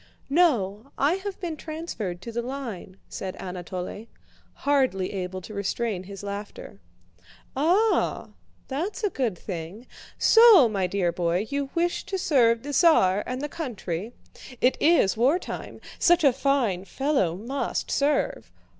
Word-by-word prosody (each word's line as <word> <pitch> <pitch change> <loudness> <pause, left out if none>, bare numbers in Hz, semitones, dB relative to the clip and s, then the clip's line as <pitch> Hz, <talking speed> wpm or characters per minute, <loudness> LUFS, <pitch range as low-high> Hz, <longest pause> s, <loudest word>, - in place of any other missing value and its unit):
"No, 245 - +2
I 285 +4 +3
have 390 0 -6
been 340 -4 -4
transferred 300 - -6
to 235 - -6
the 235 +1 -2
line," 235 -8 -6
said 190 -1 -6
Anatole, 185 +3 -6 0.5
hardly 260 -11 0
able 185 -1 -4
to 215 - -10
restrain 200 -1 -2
his 200 +1 -9
laughter. 200 - -7 0.8
"Ah! 365 +11 +2 0.4
That's 350 - -4
a 410 - +1
good 235 -9 -1
thing. 180 +6 -7 0.3
So, 450 - +7
my 195 -4 -1
dear 180 -2 0
boy, 175 +3 0
you 280 -1 -2
wish 345 +1 0
to 385 - -3
serve 235 -10 +3
the 290 +1 -5
Tsar 210 - +4
and 255 +2 -4
the - - -1
country? 225 - -5 0.5
It 250 - +3
is 315 - +4
wartime. 270 +11 -1 0.2
Such 345 -1 +4
a 275 -3 +5
fine 250 -9 0
fellow 265 - 0
must 240 +9 -3
serve. 285 0 0
240 Hz, 135 wpm, -25 LUFS, 190-295 Hz, 0.8 s, So